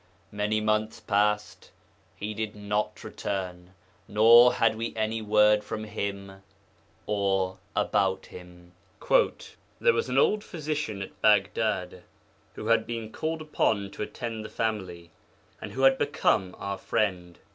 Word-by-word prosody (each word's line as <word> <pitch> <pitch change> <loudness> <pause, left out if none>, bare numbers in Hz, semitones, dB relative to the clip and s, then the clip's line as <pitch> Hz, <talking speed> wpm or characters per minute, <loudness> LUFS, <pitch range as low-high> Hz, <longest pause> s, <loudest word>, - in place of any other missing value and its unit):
Many 105 +1 0
months 110 +1 0
passed; 105 0 0 0.5
he 105 +4 -5
did 110 0 -4
not 105 0 -2
return, 90 -1 -5 0.3
nor 115 +4 +7
had 115 -1 +2
we 115 +1 -4
any 110 0 -1
word 105 0 +4
from 110 +1 -5
him 100 -2 -5 0.6
or 95 -2 0 0.2
about 95 -2 +1
him. 90 -1 -13 0.4
'There - - +1
was 455 - -1
an - - -1
old 210 0 +3
physician 150 - -4
at - - -13
Baghdad 105 -3 +1 0.5
who - - -7
had - - +2
been 115 -2 -5
called 160 +3 -3
upon 100 -9 0
to - - -9
attend 115 +1 -5
the - - -8
family, 95 -7 -3 0.5
and - - -7
who 135 - -2
had 135 0 +5
become 100 -9 +1
our 100 -1 -4
friend. 90 -5 -1
105 Hz, 135 wpm, -27 LUFS, 95-110 Hz, 0.6 s, nor